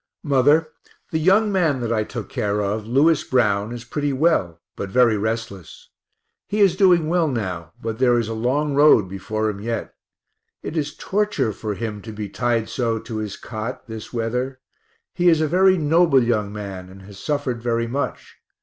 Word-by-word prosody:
Mother, 145 +2 +3 0.4
the 160 - 0
young 195 +6 +3
man 165 -8 +1
that 115 -1 -1
I 110 -1 +1
took - - -6
care 105 0 -1
of, 105 +1 -2
Lewis 145 +6 +3
Brown, 105 -4 +1
is 120 -1 -6
pretty 145 +4 -2
well, 130 - +1 0.2
but 100 - -5
very 120 0 +4
restless 110 -3 -5 0.6
he 210 - -2
is 200 -3 +5
doing 180 -5 +4
well 170 0 +2
now, 90 - -4
but 115 0 -5
there 125 -2 +4
is 115 -2 0
a 115 - -3
long 135 +6 0
road 140 -8 +5
before 110 +4 -3
him 100 -2 -4
yet; 115 +1 -4 0.7
it - - -5
is 150 -2 -2
torture 205 - 0
for 105 +1 -4
him 105 -1 -5
to 110 - -8
be 105 -1 -6
tied 115 0 0
so 115 -3 -1
to 110 0 -6
his 105 -2 -4
cot, 115 +2 -6
this 110 -1 -8
weather; 125 +3 -2 0.5
he 175 0 +3
is 165 -2 +4
a 155 - +1
very 185 +3 +4
noble 160 -3 +4
young 110 -4 0
man 100 -3 -7
and 95 +1 -13
has 100 0 -12
suffered 145 -6 -2
very 115 -1 0
much. 135 +5 -4
120 Hz, 185 wpm, -22 LUFS, 105-150 Hz, 0.7 s, is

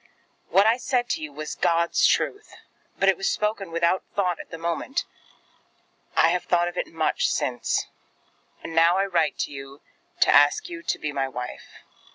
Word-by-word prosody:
What 195 +2 +5
I 225 +2 +4
said 245 -1 -1
to 180 - -1
you 150 -1 -6
was 155 +2 -6
God's 170 0 +2
truth; 415 +1 -1 0.4
but 195 - +1
it 195 -3 +4
was 195 - 0
spoken 210 -3 -1
without 170 +2 +1
thought 180 -4 0
at - - -10
the 165 - -7
moment. 170 +10 -2 1.1
I 165 - +5
have 180 +1 -1
thought 175 -1 +2
of 175 - -5
it - - -2
much 165 - 0
since; - - -1 0.8
and 165 - -7
now 165 +2 +4
I 195 - +2
write 170 -6 0
to 135 -1 -6 0.5
ask 145 - +4
you 340 -1 -7
to - - -2
be 150 - -4
my 135 -2 -1
wife. 125 -1 -8
170 Hz, 175 wpm, -25 LUFS, 155-200 Hz, 1.1 s, What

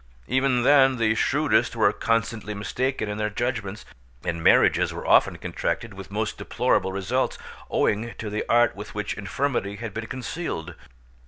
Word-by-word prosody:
Even 130 -1 +2
then 135 -1 +6
the 110 -2 +2
shrewdest 110 - +1
were - - +3
constantly 115 -2 -1
mistaken 125 +3 -2
in 105 +1 -4
their 105 0 0
judgements, 110 -2 -3 0.4
and 85 -2 -2
marriages - - +4
were - - -7
often - - +4
contracted 110 +6 -3
with 95 0 -10
most 105 +1 -3
deplorable 95 - +1
results, 100 +7 -1 0.3
owing 110 +3 0
to 110 -2 -5
the 105 - -2
art 120 0 +4
with 105 +1 -9
which 105 0 -2
infirmity 100 0 -2
had 115 -1 -6
been 110 +1 -5
concealed. 130 - -5
110 Hz, 155 wpm, -25 LUFS, 100-125 Hz, 0.4 s, then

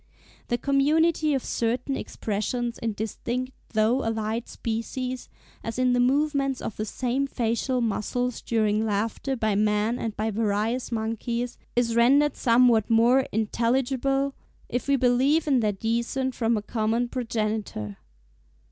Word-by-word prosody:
The 240 - 0
community 300 +3 +2
of 265 - -2
certain 245 +4 -1
expressions 235 +3 -3
in 225 -1 -2
distinct 240 +4 -3 0.2
though 225 +5 +2
allied 225 +1 -2
species, 250 +3 -4 0.3
as 225 +1 -4
in 255 -1 +3
the 245 - +2
movements 275 +1 +2
of 215 - -5
the 215 - -3
same 255 +5 -1
facial 245 +1 -1
muscles 240 +2 -1
during 215 -2 +1
laughter 220 +5 -1
by 220 -3 0
man 210 +3 +1
and 220 -2 -4
by 220 +1 0
various 220 +4 -1
monkeys, 235 +2 -2 0.2
is 235 -1 +1
rendered 275 +5 +4
somewhat 235 -3 +4
more 240 +4 +4
intelligible, 265 +5 0 0.4
if 245 +2 -2
we 280 - +4
believe 265 +5 +3
in 270 -4 +4
their 215 -2 +2
descent 235 +5 -1
from 230 -1 +1
a 210 - -3
common 225 +2 0
progenitor. 215 - -3
235 Hz, 135 wpm, -26 LUFS, 220-260 Hz, 0.4 s, rendered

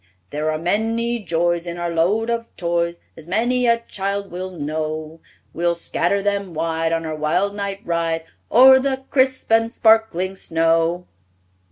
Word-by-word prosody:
There 150 +1 -1
are 155 - -1
many 225 +7 0
joys 175 -2 0
In 170 0 -5
our 175 0 -2
load 200 +8 +1
of 230 0 -2
toys, 170 0 -1 0.2
As 160 0 -11
many 240 +6 +1
a 235 0 +4
child 200 -2 -4
will 185 +2 -5
know; 155 -1 -4 0.3
We'll 170 +1 0
scatter 175 +3 -1
them 200 -4 -2
wide 165 0 -1
On 165 0 -1
our 155 -1 -3
wild 175 +7 0
night 200 -1 -4
ride 165 -1 -1 0.3
O'er 260 +2 +8
the 265 0 -1
crisp 260 -3 +1
and 225 0 +3
sparkling 220 -5 +2
snow!" 165 +1 +1
180 Hz, 155 wpm, -21 LUFS, 165-220 Hz, 0.3 s, O'er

